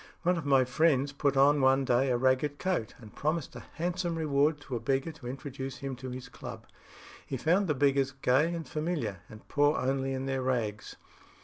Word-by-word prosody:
One 180 Hz, +1 st, +3 dB
of 160 Hz, -4 st, -4 dB
my 135 Hz, -2 st, +5 dB
friends 140 Hz, 0 st, +2 dB
put 140 Hz, -1 st, 0 dB
on 145 Hz, +1 st, +5 dB
one 135 Hz, +1 st, +4 dB
day 125 Hz, +2 st, +2 dB
a 125 Hz, -, +2 dB
ragged 130 Hz, +3 st, +1 dB
coat, 180 Hz, -, -2 dB
and 110 Hz, -4 st, -14 dB
promised 155 Hz, 0 st, -2 dB
a -, -, -6 dB, 0.2 s
handsome 175 Hz, 0 st, -1 dB
reward 150 Hz, -1 st, +1 dB
to 135 Hz, -3 st, -5 dB
a -, -, -1 dB
beggar 135 Hz, +6 st, 0 dB
to 150 Hz, -6 st, -11 dB
introduce 135 Hz, 0 st, -6 dB
him 135 Hz, 0 st, -5 dB
to 130 Hz, +1 st, -7 dB
his 125 Hz, 0 st, -7 dB
club. -, -, -9 dB, 0.6 s
He 135 Hz, -, -4 dB
found 180 Hz, +9 st, +2 dB
the 150 Hz, -, +1 dB
beggars 140 Hz, -1 st, +2 dB
gay 135 Hz, +4 st, +2 dB
and 165 Hz, -2 st, -5 dB
familiar, 150 Hz, -, -2 dB
and 110 Hz, 0 st, -13 dB
poor 145 Hz, +1 st, +2 dB
only 135 Hz, +1 st, 0 dB
in 130 Hz, 0 st, -3 dB
their 135 Hz, -1 st, -1 dB
rags. 115 Hz, -5 st, -2 dB
135 Hz, 200 wpm, -30 LUFS, 130-150 Hz, 0.6 s, my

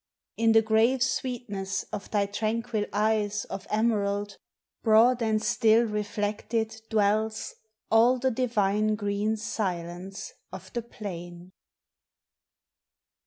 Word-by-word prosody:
Jn 225 Hz, 0 st, +4 dB
the 225 Hz, 0 st, +6 dB
grave 225 Hz, +4 st, +3 dB
sweetness 230 Hz, -7 st, -2 dB
of 200 Hz, -, -5 dB
tliy 200 Hz, -1 st, 0 dB
tranquil 220 Hz, 0 st, -1 dB
eyes 210 Hz, 0 st, 0 dB
Of 195 Hz, -1 st, -7 dB
emerald, 205 Hz, -2 st, 0 dB, 0.4 s
broad 235 Hz, +2 st, +5 dB
and 220 Hz, -1 st, +2 dB
still 225 Hz, +1 st, +3 dB
reflected 215 Hz, +1 st, -2 dB
dwells 215 Hz, 0 st, +1 dB, 0.4 s
All 235 Hz, +3 st, +5 dB
the 260 Hz, +1 st, +1 dB
divine 215 Hz, -3 st, +1 dB
green 205 Hz, +1 st, -1 dB
silence 190 Hz, -, -4 dB, 0.2 s
of -, -, -10 dB
the 240 Hz, -, -1 dB
plain. 175 Hz, -5 st, -8 dB
215 Hz, 105 wpm, -27 LUFS, 200-225 Hz, 0.4 s, the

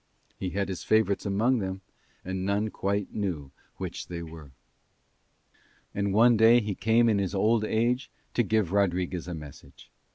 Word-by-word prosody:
He 95 Hz, -, -2 dB
had 100 Hz, +3 st, -2 dB
his 95 Hz, -2 st, -5 dB
favourites 110 Hz, -2 st, +2 dB
among 115 Hz, +6 st, +2 dB
them 95 Hz, -1 st, -4 dB, 0.4 s
and 95 Hz, 0 st, -3 dB
none 100 Hz, +2 st, 0 dB
quite 100 Hz, 0 st, -2 dB
knew 85 Hz, -10 st, -3 dB, 0.3 s
which -, -, -6 dB
they 85 Hz, -1 st, -6 dB
were. 80 Hz, -3 st, -11 dB, 1.4 s
And 100 Hz, 0 st, -1 dB
one 115 Hz, +4 st, +5 dB
day 115 Hz, +2 st, +6 dB
he 105 Hz, -3 st, -3 dB
came 115 Hz, +4 st, +3 dB
in 105 Hz, -3 st, +3 dB
his 95 Hz, 0 st, -2 dB
old 110 Hz, +3 st, +2 dB
age 120 Hz, +4 st, 0 dB, 0.2 s
to -, -, +2 dB
give 110 Hz, -5 st, +1 dB
Rodriguez 90 Hz, -3 st, 0 dB
a 90 Hz, -, -4 dB
message. 75 Hz, -3 st, -12 dB
100 Hz, 160 wpm, -27 LUFS, 90-110 Hz, 1.4 s, day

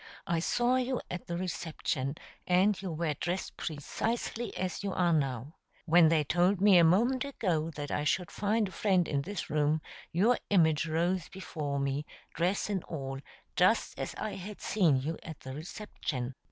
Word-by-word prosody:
I 170 Hz, -3 st, +1 dB
saw 240 Hz, +8 st, +2 dB
you 255 Hz, 0 st, 0 dB
at 175 Hz, -, -5 dB
the 170 Hz, -, -2 dB
reception, 160 Hz, -6 st, -2 dB, 0.3 s
and 190 Hz, +3 st, +3 dB
you 190 Hz, -3 st, -4 dB
were 160 Hz, -1 st, -1 dB
dressed 175 Hz, +6 st, -3 dB
precisely 225 Hz, +10 st, -3 dB
as 185 Hz, +1 st, -3 dB
you 200 Hz, -2 st, -2 dB
are 175 Hz, -2 st, +2 dB
now. 135 Hz, -2 st, -1 dB, 0.3 s
When 170 Hz, -1 st, +6 dB
they 160 Hz, -2 st, +3 dB
told 175 Hz, +6 st, +2 dB
me 195 Hz, -2 st, +7 dB
a -, -, +7 dB
moment 235 Hz, -, +4 dB
ago 180 Hz, -, -1 dB
that 145 Hz, -1 st, -5 dB
I 145 Hz, -, 0 dB
should 175 Hz, +4 st, 0 dB
find 210 Hz, +1 st, +1 dB
a -, -, -9 dB
friend 185 Hz, -5 st, +2 dB
in 140 Hz, -2 st, 0 dB
this 190 Hz, +2 st, -5 dB
room, 150 Hz, +1 st, +2 dB, 0.3 s
your 215 Hz, +9 st, +3 dB
image 160 Hz, -5 st, +4 dB
rose 170 Hz, +2 st, 0 dB
before 155 Hz, -7 st, -4 dB
me, 140 Hz, +2 st, -1 dB, 0.3 s
dress 180 Hz, +4 st, 0 dB
and 195 Hz, -4 st, -1 dB
all, 135 Hz, -4 st, -5 dB, 0.4 s
just -, -, +3 dB
as -, -, -4 dB
I 215 Hz, -, -3 dB
had 200 Hz, +2 st, -8 dB
seen 170 Hz, -10 st, +3 dB
you 155 Hz, +4 st, -3 dB
at 160 Hz, -2 st, -9 dB
the 130 Hz, -, -7 dB
reception." 150 Hz, -5 st, -5 dB
175 Hz, 175 wpm, -31 LUFS, 150-195 Hz, 0.4 s, me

